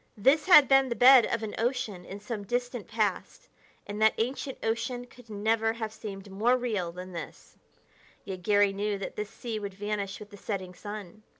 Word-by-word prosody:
This 275 Hz, -, +3 dB
had 300 Hz, -7 st, +9 dB
been 270 Hz, 0 st, +5 dB
the 235 Hz, -, -1 dB
bed 255 Hz, 0 st, +8 dB
of 230 Hz, -1 st, -2 dB
an 215 Hz, -, -4 dB
ocean 225 Hz, -7 st, -2 dB
in 195 Hz, -, -8 dB
some 210 Hz, +1 st, -5 dB
distant 245 Hz, +1 st, -3 dB
past, 215 Hz, -4 st, -2 dB, 0.4 s
and 205 Hz, +1 st, -6 dB
that 220 Hz, 0 st, +5 dB
ancient 260 Hz, +3 st, -2 dB
ocean 230 Hz, +2 st, -2 dB
could 245 Hz, -1 st, -18 dB
never 220 Hz, +2 st, +1 dB
have 220 Hz, -2 st, -5 dB
seemed 200 Hz, -3 st, -8 dB
more 230 Hz, +6 st, +2 dB
real 210 Hz, -9 st, -2 dB
than 180 Hz, +2 st, -9 dB
this; 170 Hz, -, -9 dB, 0.7 s
yet 185 Hz, -2 st, -6 dB
Garry 205 Hz, +1 st, +3 dB
knew 205 Hz, +1 st, -1 dB
that 195 Hz, -, -6 dB
this 210 Hz, -1 st, -4 dB
sea 225 Hz, -1 st, -5 dB
would 200 Hz, -2 st, -6 dB
vanish 205 Hz, -1 st, -3 dB
with 210 Hz, 0 st, -11 dB
the 205 Hz, -, -11 dB
setting 190 Hz, -3 st, -5 dB
sun. 205 Hz, 0 st, -8 dB
215 Hz, 190 wpm, -28 LUFS, 200-240 Hz, 0.7 s, had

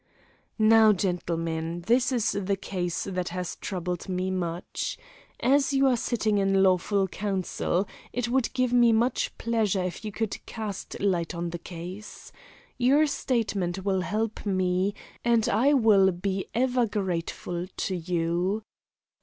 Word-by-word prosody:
"Now, 220 Hz, -1 st, +6 dB
gentlemen, 170 Hz, -3 st, -2 dB
this 245 Hz, +4 st, +3 dB
is 230 Hz, -3 st, +1 dB
the 200 Hz, 0 st, -1 dB
case 180 Hz, -3 st, -3 dB
that 180 Hz, -2 st, -3 dB
has 180 Hz, 0 st, -4 dB
troubled 180 Hz, -1 st, -4 dB
me 185 Hz, 0 st, -1 dB
much. 175 Hz, -1 st, -3 dB, 0.4 s
As 275 Hz, +2 st, +3 dB
you 275 Hz, 0 st, +4 dB
are 260 Hz, -2 st, +4 dB
sitting 220 Hz, -3 st, 0 dB
in 195 Hz, 0 st, +3 dB
lawful 190 Hz, +1 st, +2 dB
council, 190 Hz, -1 st, -1 dB, 0.2 s
it 245 Hz, -1 st, -1 dB
would 255 Hz, 0 st, +1 dB
give 255 Hz, -1 st, +1 dB
me 240 Hz, -2 st, +6 dB
much 235 Hz, +3 st, +1 dB
pleasure 215 Hz, -5 st, 0 dB
if 180 Hz, +4 st, -4 dB
you 215 Hz, -, -4 dB
could 220 Hz, 0 st, -3 dB
cast 215 Hz, -4 st, -6 dB
light 180 Hz, -4 st, 0 dB
on 170 Hz, 0 st, -3 dB
the 175 Hz, -, -5 dB
case. 180 Hz, +5 st, -9 dB, 0.5 s
Your 275 Hz, +5 st, +5 dB
statement 200 Hz, -, -1 dB
will 190 Hz, -2 st, +1 dB
help 215 Hz, +4 st, -2 dB
me, 185 Hz, 0 st, 0 dB, 0.3 s
and 235 Hz, -1 st, +3 dB
I 245 Hz, +6 st, +3 dB
will 210 Hz, -7 st, +5 dB
be 190 Hz, +2 st, -3 dB
ever 250 Hz, 0 st, +2 dB
grateful 180 Hz, -3 st, -3 dB
to 185 Hz, 0 st, -3 dB
you. 175 Hz, +4 st, -1 dB
195 Hz, 140 wpm, -27 LUFS, 180-225 Hz, 0.5 s, Now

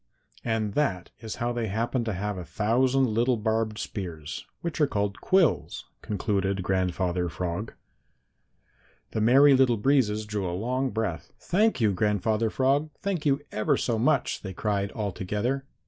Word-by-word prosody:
And 110 Hz, -3 st, -1 dB
that 100 Hz, -11 st, -1 dB
is 110 Hz, -1 st, -6 dB
how 120 Hz, 0 st, -1 dB
they 120 Hz, -2 st, -2 dB
happen 115 Hz, +4 st, -1 dB
to 110 Hz, -, -1 dB
have 105 Hz, +3 st, -3 dB
a 90 Hz, -, -5 dB
thousand 125 Hz, +8 st, +2 dB
little 120 Hz, +3 st, +2 dB
barbed 110 Hz, 0 st, -1 dB
spears, 85 Hz, -9 st, -6 dB
which 170 Hz, -2 st, -3 dB
are 150 Hz, -, +5 dB
called 100 Hz, -5 st, -2 dB
quills," 185 Hz, -7 st, +2 dB, 0.2 s
concluded 100 Hz, -2 st, -1 dB
Grandfather 90 Hz, -1 st, 0 dB
Frog. 90 Hz, +5 st, -4 dB, 1.4 s
The 110 Hz, -, -1 dB
Merry 135 Hz, +6 st, +6 dB
Little 130 Hz, -3 st, +4 dB
Breezes 110 Hz, -3 st, +2 dB
drew 105 Hz, -3 st, -2 dB
a 90 Hz, -, -3 dB
long 130 Hz, +5 st, -1 dB
breath. 105 Hz, -9 st, -3 dB
"Thank 210 Hz, +4 st, +1 dB
you, 110 Hz, -2 st, +4 dB
Grandfather 105 Hz, +3 st, +1 dB
Frog, 140 Hz, +6 st, +1 dB
thank 185 Hz, -6 st, -2 dB
you 140 Hz, 0 st, +2 dB
ever 105 Hz, -, +1 dB
so 115 Hz, -3 st, 0 dB
much!" 140 Hz, +2 st, +1 dB
they 95 Hz, -2 st, -6 dB
cried 100 Hz, 0 st, -1 dB
all 105 Hz, -3 st, -2 dB
together. 105 Hz, +10 st, -2 dB
110 Hz, 155 wpm, -27 LUFS, 100-130 Hz, 1.4 s, Merry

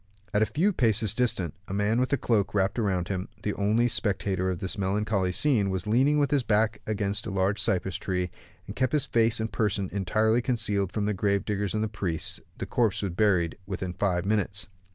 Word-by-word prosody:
At 105 Hz, -, +3 dB
a 110 Hz, -, +3 dB
few 190 Hz, +7 st, +1 dB
paces 110 Hz, -, +2 dB
distant, 110 Hz, -, 0 dB
the 95 Hz, -, -4 dB
man 105 Hz, +3 st, +1 dB
with 130 Hz, 0 st, +1 dB
the 140 Hz, -, +2 dB
cloak 105 Hz, -6 st, 0 dB
wrapped 95 Hz, +3 st, +1 dB
round 95 Hz, -5 st, 0 dB
him, 95 Hz, -1 st, -3 dB, 0.2 s
the 105 Hz, -, -1 dB
only 110 Hz, +4 st, +2 dB
spectator 95 Hz, -4 st, 0 dB
of 90 Hz, -, -2 dB
this 95 Hz, 0 st, -3 dB
melancholy 100 Hz, -1 st, 0 dB
scene, 105 Hz, -, +2 dB
was 95 Hz, -1 st, -2 dB
leaning 130 Hz, +7 st, +3 dB
with 145 Hz, -2 st, +2 dB
his 145 Hz, -2 st, +3 dB
back 110 Hz, -1 st, +1 dB
against 105 Hz, 0 st, -1 dB
a -, -, -3 dB
large 95 Hz, +1 st, +1 dB
cypress 95 Hz, -1 st, 0 dB
tree, 90 Hz, -2 st, -2 dB, 0.3 s
and 100 Hz, -, -8 dB
kept 130 Hz, +1 st, 0 dB
his 150 Hz, -3 st, +2 dB
face 115 Hz, -1 st, +2 dB
and 110 Hz, 0 st, -2 dB
person 100 Hz, -3 st, -1 dB
entirely 110 Hz, +4 st, +2 dB
concealed 105 Hz, -6 st, 0 dB
from 105 Hz, -1 st, -1 dB
the 105 Hz, -, 0 dB
grave 100 Hz, +1 st, 0 dB
diggers 105 Hz, -1 st, -1 dB
and 110 Hz, -, 0 dB
the -, -, 0 dB
priests; 85 Hz, -6 st, -2 dB, 0.2 s
the -, -, -4 dB
corpse 115 Hz, -4 st, 0 dB
was 95 Hz, -, -1 dB
buried 90 Hz, -3 st, +2 dB, 0.2 s
in 90 Hz, -1 st, -4 dB
five 90 Hz, -1 st, 0 dB
minutes. 105 Hz, -1 st, 0 dB
105 Hz, 210 wpm, -27 LUFS, 95-110 Hz, 0.3 s, At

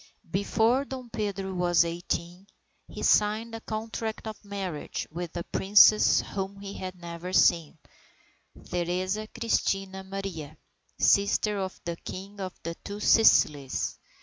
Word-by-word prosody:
Before 225 Hz, +6 st, +2 dB
Dom 260 Hz, -4 st, -8 dB
Pedro 195 Hz, -2 st, -3 dB
was 175 Hz, -1 st, +3 dB
eighteen, 175 Hz, +2 st, -4 dB, 0.4 s
he -, -, -8 dB
signed 215 Hz, +2 st, +2 dB
a 225 Hz, -, -6 dB
contract 220 Hz, 0 st, -4 dB
of 220 Hz, 0 st, -7 dB
marriage 195 Hz, -6 st, -4 dB
with 175 Hz, +1 st, -5 dB
a 170 Hz, -, -2 dB
Princess 205 Hz, +3 st, +5 dB
whom 195 Hz, 0 st, -5 dB
he 200 Hz, 0 st, -7 dB
had 185 Hz, 0 st, -6 dB
never 170 Hz, +1 st, -7 dB
seen, 165 Hz, -4 st, +3 dB, 0.9 s
Theresa 185 Hz, +4 st, -1 dB
Christina 195 Hz, -4 st, -1 dB
Maria, 190 Hz, -6 st, -6 dB, 0.4 s
sister 200 Hz, +1 st, +3 dB
of 190 Hz, -1 st, -4 dB
the 170 Hz, -1 st, -3 dB
King 195 Hz, +4 st, -8 dB
of 185 Hz, -1 st, -6 dB
the 165 Hz, -, -3 dB
two 205 Hz, +1 st, -6 dB
Sicilies. 145 Hz, -, +3 dB
195 Hz, 125 wpm, -28 LUFS, 175-210 Hz, 0.9 s, Princess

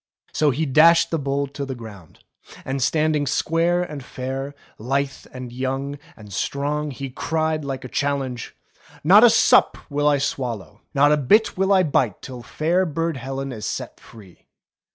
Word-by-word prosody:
So 150 Hz, -, +2 dB
he 145 Hz, +4 st, 0 dB
dashed 160 Hz, +4 st, +5 dB
the 165 Hz, -, 0 dB
bowl 140 Hz, 0 st, -1 dB
to 140 Hz, 0 st, -6 dB
the 135 Hz, -1 st, -5 dB
ground, 105 Hz, -8 st, -12 dB, 0.4 s
and 135 Hz, 0 st, -3 dB
standing 150 Hz, +1 st, +1 dB
square 165 Hz, +5 st, +1 dB
and 150 Hz, -6 st, -7 dB
fair, 135 Hz, +3 st, -5 dB, 0.2 s
lithe, 135 Hz, +3 st, -2 dB
and 125 Hz, -1 st, -8 dB
young, 135 Hz, +2 st, -3 dB, 0.2 s
and 105 Hz, -2 st, -12 dB
strong, 145 Hz, +7 st, -2 dB
he 135 Hz, -1 st, -6 dB
cried 160 Hz, +2 st, -1 dB
like 135 Hz, -1 st, -5 dB
a -, -, -4 dB
chal 140 Hz, +3 st, 0 dB
lenge: 125 Hz, -3 st, -6 dB, 0.5 s
*'Not 195 Hz, +8 st, +7 dB
a 240 Hz, -, +9 dB
sup 225 Hz, 0 st, +4 dB
will 145 Hz, +1 st, +1 dB
I 145 Hz, -1 st, +4 dB
swallow, 120 Hz, -, -4 dB
not 145 Hz, +1 st, +5 dB
a 150 Hz, -, +4 dB
bit 205 Hz, -, +3 dB
will 190 Hz, +1 st, +1 dB
I 190 Hz, -2 st, +5 dB
bite 130 Hz, -, 0 dB
till 125 Hz, -2 st, -8 dB
fair 165 Hz, +9 st, 0 dB
Burd 165 Hz, 0 st, -2 dB
Helen 135 Hz, +2 st, -5 dB
is 110 Hz, -4 st, -5 dB
set -, -, -5 dB
free." 100 Hz, -6 st, -17 dB
140 Hz, 175 wpm, -22 LUFS, 130-155 Hz, 0.5 s, a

